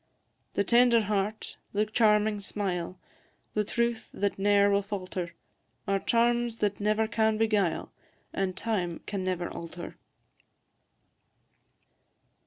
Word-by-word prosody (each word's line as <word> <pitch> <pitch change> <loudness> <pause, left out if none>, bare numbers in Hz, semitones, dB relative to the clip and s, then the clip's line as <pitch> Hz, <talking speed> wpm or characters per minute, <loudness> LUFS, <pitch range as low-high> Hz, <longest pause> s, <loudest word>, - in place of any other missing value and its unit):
The 200 - +2
tender 235 +2 +5
heart, 210 +1 -2 0.2
the 210 +1 +2
charming 210 -1 +3
smile, 185 -3 -3 0.6
The 210 - +1
truth 235 +1 -1
that 200 -1 -1
ne'er 200 0 +4
will 200 0 +3
falter, 185 -3 -5 0.5
Are 195 0 +2
charms 235 +1 +1
that 205 -2 0
never 215 +1 +1
can 220 0 +1
beguile, 210 -6 +1 0.4
And 190 -1 -1
time 185 -7 -2
can 200 -2 -3
never 180 -2 -1
alter. 170 +1 -8
205 Hz, 110 wpm, -29 LUFS, 195-220 Hz, 0.6 s, tender